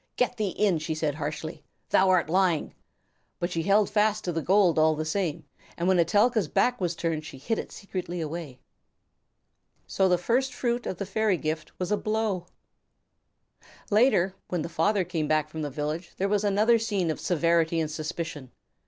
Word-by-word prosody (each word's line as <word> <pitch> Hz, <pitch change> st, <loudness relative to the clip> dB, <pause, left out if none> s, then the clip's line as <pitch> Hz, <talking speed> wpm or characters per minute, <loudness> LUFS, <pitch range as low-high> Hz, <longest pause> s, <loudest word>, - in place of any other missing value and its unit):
"Get 250 Hz, 0 st, 0 dB
thee 210 Hz, -3 st, 0 dB
in," 190 Hz, -3 st, +1 dB
she 160 Hz, +1 st, -3 dB
said 155 Hz, -2 st, -1 dB
harshly. 155 Hz, +2 st, -5 dB, 0.3 s
"Thou 190 Hz, 0 st, +4 dB
are 185 Hz, -2 st, +4 dB
lying." 175 Hz, -1 st, +1 dB, 0.6 s
But 175 Hz, 0 st, -2 dB
she 165 Hz, -, -1 dB
held 200 Hz, +3 st, +3 dB
fast 215 Hz, 0 st, +1 dB
to 180 Hz, -, -1 dB
the 165 Hz, -1 st, -2 dB
gold 185 Hz, -2 st, +3 dB
all 155 Hz, 0 st, +4 dB
the 155 Hz, +1 st, -3 dB
same, 165 Hz, -1 st, -2 dB, 0.3 s
and 170 Hz, -, -1 dB
when 185 Hz, -1 st, +4 dB
Etelka's 205 Hz, +4 st, +3 dB
back 245 Hz, +8 st, +1 dB
was 175 Hz, -1 st, 0 dB
turned 165 Hz, -2 st, -2 dB
she 145 Hz, -, -9 dB
hid 215 Hz, +12 st, -2 dB
it -, -, -6 dB
secretly 185 Hz, -3 st, -5 dB
away. 160 Hz, -4 st, -5 dB, 1.3 s
So 190 Hz, -1 st, +1 dB
the 180 Hz, -, +4 dB
first 250 Hz, +9 st, 0 dB
fruit 240 Hz, -1 st, -1 dB
of 185 Hz, -, -3 dB
the 200 Hz, -, -3 dB
fairy 205 Hz, 0 st, +1 dB
gift 155 Hz, 0 st, -4 dB
was 180 Hz, +1 st, -3 dB
a 210 Hz, -, +3 dB
blow! 215 Hz, -5 st, -1 dB, 1.4 s
Later, 205 Hz, -4 st, +4 dB
when 175 Hz, -4 st, -2 dB
the -, -, -5 dB
father 185 Hz, +5 st, +1 dB
came 165 Hz, -3 st, -2 dB
back 155 Hz, 0 st, +1 dB
from 160 Hz, +1 st, -6 dB
the 150 Hz, -, -2 dB
village, 150 Hz, +5 st, -4 dB
there 195 Hz, -, 0 dB
was 205 Hz, 0 st, +1 dB
another 210 Hz, +3 st, +3 dB
scene 200 Hz, -7 st, 0 dB
of 155 Hz, -, -5 dB
severity 165 Hz, -1 st, +2 dB
and 155 Hz, -1 st, -1 dB
suspicion. 155 Hz, -3 st, -5 dB
175 Hz, 185 wpm, -27 LUFS, 160-205 Hz, 1.4 s, Thou